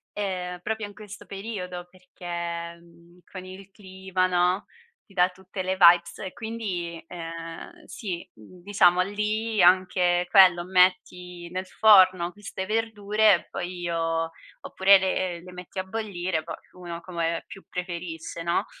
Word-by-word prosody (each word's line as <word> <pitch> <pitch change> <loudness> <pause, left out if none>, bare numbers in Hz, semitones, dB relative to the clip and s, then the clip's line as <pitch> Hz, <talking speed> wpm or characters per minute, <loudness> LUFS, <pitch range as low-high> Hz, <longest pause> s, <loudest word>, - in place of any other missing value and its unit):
Ehm, 180 -3 -3
proprio 220 +1 -3
in 205 - -10
questo 210 -1 -11
periodo 185 -4 -6
perché, 170 -2 -6
mhmm, 170 +1 -21
con 185 -1 -8
il 190 +1 -11
clima, 190 -2 -2
no, 180 +1 +1 0.4
ti 200 - -21
dà 180 -1 +3
tutte 190 +1 -7
le 185 +1 0
vibes 170 -1 +5
e 190 - -6
quindi, 195 -7 -5
ehm, 165 - -8
sì, 180 -6 -6
uhm, 175 - -16
diciamo 180 -2 +4
lì 210 +3 -1
anche 180 -1 +3
quello, 185 -3 +6
metti 180 -1 +1
nel 185 +1 -4
forno 185 -4 +5
queste 205 -1 -7
verdure 215 -1 +2
e 175 - -1
poi 175 0 -5
io 165 -1 -1 0.3
oppure 195 +1 +5
le 185 -2 -1
le 180 - -11
metti 180 +1 -8
a - - -1
bollire, 185 -5 -3
poi - - -6 0.2
uno 175 -2 -8
come 170 -2 -2
più 195 - -12
preferisce, 170 -2 -6
no? 170 0 0
185 Hz, 145 wpm, -26 LUFS, 175-195 Hz, 0.4 s, quello